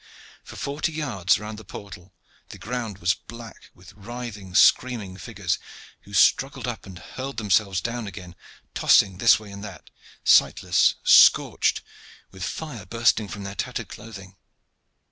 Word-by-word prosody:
For - - -12
forty 145 +4 -3
yards 125 - 0
round 105 +1 -8
the - - -12
portal 95 -2 -11 0.3
the - - -10
ground 115 -4 -5
was 90 -1 +1
black 115 -1 -12
with 90 0 -16
writhing, 105 -3 -8
screaming 105 -1 +3
figures, 100 -5 -3 0.5
who - - -15
struggled - - +3
up - - -6
and 95 -2 -10
hurled 130 +7 -8
themselves 100 -3 +1
down 120 0 -4
again, 90 -2 -10 0.4
tossing 95 -2 +3
this 115 - +5
way 105 -2 -12
and 100 0 -9
that, 100 -3 -11 0.3
sightless, - - +4
scorched, - - +5 0.5
with 95 -1 -9
fire 125 - -6
bursting 115 -1 +1
from 100 0 -8
their 100 0 -6
tattered - - -5
clothing. 100 -4 -11
105 Hz, 145 wpm, -24 LUFS, 95-115 Hz, 0.5 s, this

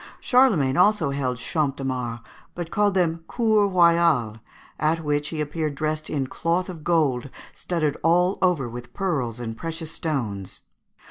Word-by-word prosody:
Charlemagne 200 - +3
also 190 -6 +3
held 130 -3 -2
Champs 145 +1 -1
de 135 - -6
Mars, 125 -3 -3 0.3
but 170 -1 -5
called 205 -1 +2
them 165 -3 +1
Cours 215 -4 +2
Royales, 170 - +3 0.4
at 160 +2 +1
which 145 0 0
he 160 - -5
appeared 150 0 -2
dressed 155 +1 -2
in 140 -3 -1
cloth 170 +7 -1
of 165 -4 -8
gold 140 -6 +1 0.2
studded 155 -5 -1
all 180 +3 +3
over 175 -9 +2
with 120 +1 -9
pearls 135 - -2
and 115 -2 -5
precious 165 +3 -6
stones. 115 - -4
155 Hz, 150 wpm, -24 LUFS, 135-175 Hz, 0.4 s, Charlemagne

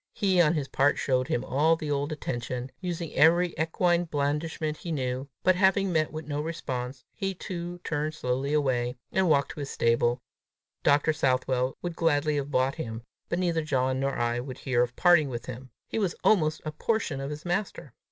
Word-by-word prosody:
He 190 -3 +3
on 165 0 +3
his 145 -3 -1
part 140 +1 +2
showed 130 -1 +1
him 120 - -1
all 155 +5 +3
the 155 -2 -4
old 145 +2 -1
attention, 125 -3 -4
using 170 -3 -4
every 170 +2 +4
equine 175 +2 +1
blandishment 150 +1 -2
he 170 - -6
knew; 130 -2 -2
but 185 - +5
having 190 +1 +3
met 155 -1 +1
with 155 0 -6
no 145 0 -2
response, 130 -5 -4
he 195 -2 -3
too 175 -1 -5
turned 155 0 -2
slowly 130 0 -1
away, 130 -5 +1
and 190 -2 +2
walked 140 -2 +3
to - - -9
his 140 -1 -4
stable, 120 +1 +2 0.6
Dr. 145 +2 +3
Southwell 130 -2 0
would 175 -1 -3
gladly 150 -2 +2
have 140 0 -2
bought 130 -1 +2
him, 115 -3 -6 0.3
but 170 - 0
neither 170 -3 +1
John 130 -3 0
nor 135 0 0
I 120 0 0
would 130 0 -6
hear 125 -3 +1
of 125 0 -1
parting 175 -5 +5
with 120 -2 -5
him: 125 +1 -8 0.2
he - - -2
was 195 -5 0
almost 155 -7 +3
a 155 - -2
portion 155 -4 -1
of 135 - -4
his 150 +3 -7
master! 175 - -3
150 Hz, 190 wpm, -28 LUFS, 130-170 Hz, 0.6 s, but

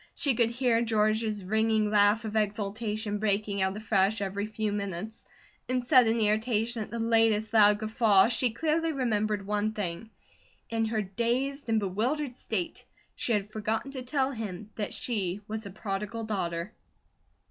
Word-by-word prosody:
She 280 -5 +2
could 230 -1 +2
hear 235 -1 +1
George's 215 -2 +1
ringing 220 +1 +1
laugh 210 +2 +4
of 215 0 -5
exultation 210 0 -1
breaking 205 -1 0
out 190 +1 0
afresh 210 -1 +1
every 200 +1 -2
few 215 -1 -2
minutes; 200 +2 -5 0.4
in 255 0 +1
sudden 240 -3 +4
irritation 220 +2 +1
at 210 - -5
the 235 - -5
latest 225 -1 +2
guffaw 215 -1 +5
she 245 +1 +1
clearly 320 +6 0
remembered 215 -6 0
one 210 +1 0
thing: 205 +1 -4 0.6
in 225 -1 +1
her 220 -1 -1
dazed 240 +7 -2
and 225 -1 +3
bewildered 245 +8 -1
state 200 -8 -3 0.3
she 235 - -1
had 205 -2 +1
forgotten 220 +5 -3
to 265 -2 -4
tell 265 +1 0
him 215 -4 -6
that 210 -2 -3
she 200 -5 -2
was 220 -1 -5
a - - -7
Prodigal 205 +2 -4
Daughter. 185 -2 -3
215 Hz, 150 wpm, -28 LUFS, 205-230 Hz, 0.6 s, guffaw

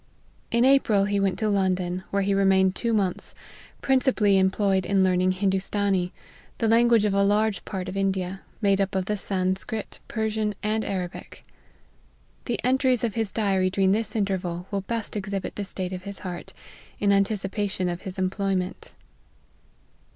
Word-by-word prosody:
In 235 +1 +3
April 230 -7 +4
he 205 0 0
went 195 -2 +1
to 215 - 0
London, 185 -2 0
where 200 0 0
he 200 +1 +1
remained 190 -1 +3
two 235 - -1
months, 195 -5 -1 0.5
principally 250 -7 +3
employed 190 0 +2
in 195 0 +2
learning 185 0 +2
Hin 190 +1 +1
doostanee, 195 -1 0 0.5
the 225 - 0
language 230 -1 +4
of 205 - +1
a 200 0 +3
large 210 +1 +1
part 185 -3 -4
of 185 - -5
India, 190 -1 -1 0.2
made 200 -1 +3
up 195 0 -1
of 190 -1 0
the 210 - -1
Sanscrit, 195 +2 -2
Persian, 220 -1 -1
and 215 +1 0
Arabic. 180 -2 -5 1.0
The 240 - -2
entries 255 -1 +2
of 230 -3 0
his 225 -3 -2
diary 195 -4 +1
during 190 0 +2
this 220 +3 -1
interval 185 -4 -1
will 200 -1 -1
best 225 +2 -4
exhibit 200 -2 -4
the 205 - -3
state 190 -1 -3
of 180 - -5
his 200 +1 -7
heart, 175 -2 -6 0.5
in 200 -1 +3
anticipation 200 -1 0
of 175 0 -3
his 190 0 -7
employment. 190 -1 -2
195 Hz, 160 wpm, -25 LUFS, 190-210 Hz, 1.0 s, April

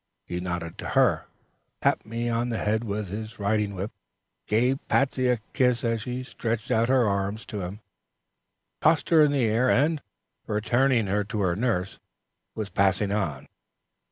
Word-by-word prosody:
He 90 - -4
nodded 85 -2 -4
to - - -5
her, - - +3 0.5
tapped - - +1
me 115 +2 -3
on 120 +1 0
the 115 - -1
head 110 +2 0
with 105 -3 -3
his 110 +3 -6
riding 105 0 0
whip, 95 +4 -4 0.6
gave 125 +5 +2
Patsey 130 -2 +2
a 125 -1 +3 0.2
kiss 125 -3 +2
as 115 -2 0
she 125 +1 -4
stretched 115 -2 -3
out 115 +2 +2
her 130 -3 +4
arms 100 +2 -1
to 105 -3 -5
him, 95 +4 -6 1.0
tossed 160 0 +3
her 165 -2 +6
in 150 -1 +5
the 135 -4 +2
air, 115 +4 +2
and, 150 +3 +2 0.5
returning 115 +3 +2
her 100 +2 0
to 105 0 -3
her 90 -3 +1
nurse, 100 -4 -1 0.6
was 105 -2 -4
passing 100 +1 +2
on. 85 -10 -2
110 Hz, 165 wpm, -26 LUFS, 100-125 Hz, 1.0 s, her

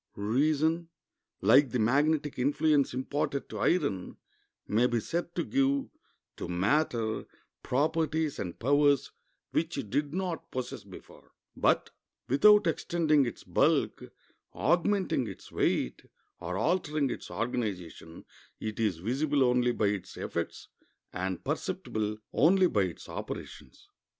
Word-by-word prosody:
Reason, 155 +10 +1 0.5
like 140 -1 +6
the 125 - -1
magnetic 145 +5 +1
influence 145 +2 +2
imparted 140 +2 -2
to - - -6
iron, 140 - 0 0.5
may 115 +4 +3
be 120 -1 0
said 170 +8 -3
to 170 - 0
give 275 - +1 0.5
to - - -5
matter 110 - 0 0.3
properties 155 +2 0
and 90 -3 -4
powers 145 +2 +3 0.4
which 165 0 -1
it 110 -8 -5
did 145 -1 0
not 180 -1 -3
possess 130 -1 -5
before; - - -14 0.2
but, - - +2 0.4
without 205 - +6
extending 155 -4 +2
its - - -7
bulk, - - +1 0.4
augmenting 175 - +1
its 95 - -10
weight, - - 0 0.4
or 90 +2 -4
altering 150 - 0
its - - -6
organization, 100 -8 -4 0.3
it 110 0 -5
is 105 -7 +1
visible 135 - +1
only 125 -1 +3
by 110 - 0
its 100 -2 -2
effects - - -4 0.5
and 95 0 -3
perceptible 105 0 -2 0.2
only 185 +5 +5
by 105 - +2
its 90 - -8
operations. 65 - -8
140 Hz, 120 wpm, -29 LUFS, 110-160 Hz, 0.5 s, like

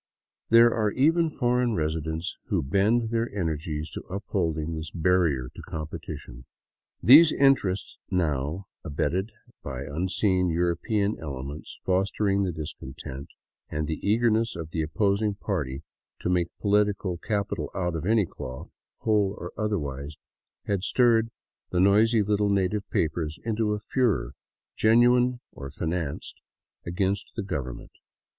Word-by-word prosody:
There 115 +1 +7
are 110 -2 +1
even 160 +8 +3
foreign 125 -4 +1
residents 80 +2 -2
who 95 -6 0
bend 110 - +2
their 115 0 0
energies 80 -4 -3
to - - -6
upholding 85 -5 -2
this 80 0 -5
barrier 85 -7 +1
to - - -10
competition. 75 -5 -7 0.6
These 150 +7 +9
interests 125 -9 +2
now, 80 0 -1 0.2
abetted 85 +6 -1 0.3
by 65 -1 -5
unseen 90 +5 0
European 90 +5 0
elements 70 0 -7
foster 95 +3 +1
ing 100 0 +2
the 95 -2 0
discontent, 70 -3 -7 0.4
and 75 0 -2
the 80 0 -3
eagerness 115 +1 +2
of 80 -2 -6
the 80 - -1
opposing 100 +6 +1
party 75 -10 -3 0.4
to - - -1
make 90 -1 +1
political 100 -3 +1
capital 105 +1 -2
out 90 -3 -1
of 80 - -3
any 110 +1 +3
cloth, 65 -5 -9 0.3
whole 105 -2 +2
or 90 - -7
otherwise, 75 -9 -3 0.5
had 100 -3 0
stirred 115 0 +3 0.4
the 90 - 0
noisy 105 +4 +5
little 105 0 +1
native 100 +1 0
papers 80 0 -1
into 110 -1 0
a 105 - -2
furor, 110 - 0 0.4
genuine 120 +2 +4
or 70 0 -8
financed, 80 0 -4 0.5
against 95 +3 -1
the 110 - -2
Government. 70 -10 -5
95 Hz, 130 wpm, -26 LUFS, 80-105 Hz, 0.6 s, These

